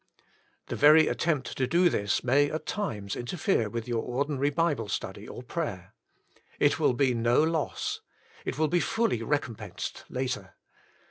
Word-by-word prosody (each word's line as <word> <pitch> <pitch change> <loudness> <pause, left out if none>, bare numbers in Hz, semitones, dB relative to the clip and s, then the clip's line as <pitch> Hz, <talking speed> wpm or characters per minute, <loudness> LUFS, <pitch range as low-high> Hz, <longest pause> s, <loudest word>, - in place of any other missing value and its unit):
The - - -4
very 155 +2 +7
attempt 155 -6 -1
to 130 - +1
do 175 +4 +4
this, 100 -11 0
may 140 +4 +3
at 155 - -4
times 105 - -3
in 120 - -5
terfere 180 - +1
with 115 +2 -4
your 120 -2 0
ordinary 140 +3 0
Bible 145 -8 0
study, - - -4
or - - -8
prayer. - - -4 0.7
It - - +3
will - - +3
be 130 0 +2
no 120 +4 +3
loss. 160 -2 -1 0.4
It - - -4
will 155 0 +2
be 175 +3 +2
fully 225 - 0
recompensed 120 -3 -3
later. 130 0 -3
140 Hz, 155 wpm, -28 LUFS, 120-160 Hz, 0.7 s, very